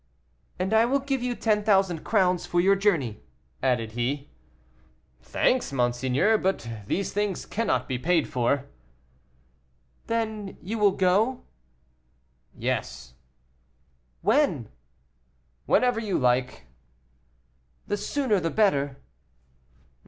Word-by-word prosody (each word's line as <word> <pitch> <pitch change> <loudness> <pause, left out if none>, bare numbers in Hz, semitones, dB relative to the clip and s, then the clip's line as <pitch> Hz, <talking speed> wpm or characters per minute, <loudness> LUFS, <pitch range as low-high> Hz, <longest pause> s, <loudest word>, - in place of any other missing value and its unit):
"And 190 +3 -1
I 220 +1 +5
will 265 +4 +2
give 270 -1 -2
you 245 0 -2
ten 210 -3 +1
thousand 195 -5 +2
crowns 185 -4 +1
for 175 - +1
your 195 +3 +4
journey," 165 - 0 0.4
added 120 -4 0
he. 130 +5 -3 0.9
"Thanks, 255 - 0
monseigneur, 130 - +1
but 190 -11 -1 0.2
these 195 - -2
things 205 -2 -1
cannot 165 - -1
be 125 -1 -2
paid 165 +2 +2
for." 130 +2 0 1.4
"Then 220 -3 -3
you 215 +5 -5
will 205 -1 +5
go?" 200 +8 +1 1.1
"Yes." - - -3 1.1
"When?" 215 - +2 1.0
"Whenever 245 -2 +3
you 210 -4 -1
like." 125 - 0 1.2
"The - - -1
sooner 215 0 0
the 165 -1 -1
better." 145 -10 +1
190 Hz, 105 wpm, -26 LUFS, 135-220 Hz, 1.4 s, I